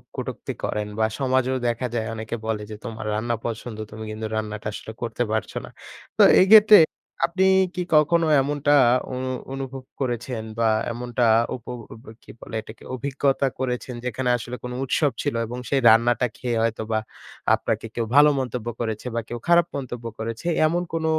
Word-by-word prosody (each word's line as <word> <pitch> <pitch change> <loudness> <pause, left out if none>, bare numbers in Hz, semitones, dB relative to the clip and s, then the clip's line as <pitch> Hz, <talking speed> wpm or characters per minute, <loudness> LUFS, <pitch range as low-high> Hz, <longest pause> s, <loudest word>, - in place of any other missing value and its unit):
কুটক্তি - - -5
করেন 105 0 -2
বা 110 - +4
সমাজেও 130 -1 +1
দেখা 120 +2 -1
যায় 110 -2 -1
অনেকে 110 +1 -5
বলে 110 -1 -1
যে, 110 - -6
"তোমার 115 -2 -6
রান্না 115 +2 -1
পছন্দ, 115 -1 -5
তুমি 110 +1 -7
কিন্তু 110 +1 -5
রান্নাটা 105 -1 -4
আসলে 110 - -7
করতে 120 +1 -1
পারছো 110 -1 -2
না।" - - -12 0.5
তো - - +5 0.2
এইক্ষেত্রে 210 +2 +9 0.5
আপনি 185 +2 0 0.3
কি 180 - -1
কখন 150 +3 +5 0.2
এমনটা 145 +1 0 0.4
অনু 130 +1 -3 0.3
অনুভব 135 -1 -6 0.2
করেছেন 120 -2 -2 0.2
বা 115 - +3 0.2
এমনটা 120 +1 -2 0.3
উপ 125 - -10 0.3
ব - - -17
ব - - -21 0.2
কি - - -12
বলে - - -8
এটাকে? 110 +1 -13
অভিজ্ঞতা 135 +1 0
করেছেন 125 -1 -3
যেখানে 125 +1 -1
আসলে 120 +1 -6
কোন 125 - -5
উৎসব 140 +2 +1
ছিল 145 -5 -2
এবং 125 +2 -6
সেই 140 -1 +2
রান্নাটা 120 +2 +4
খেয়ে 120 -2 -2
হয়তোবা 110 -1 -1 0.6
আপনাকে - - -2
কেউ 115 - -1
ভালো 145 +1 +8
মন্তব্য 125 -3 -4
করেছে 110 -1 -3
বা - - +1
কেউ 120 - -4
খারাপ 170 -1 +5
মন্তব্য 125 -3 -6
করেছে? 115 +9 -4 0.2
এমন 175 +3 0
কোন 165 -1 -1
125 Hz, 170 wpm, -24 LUFS, 115-135 Hz, 0.6 s, এইক্ষেত্রে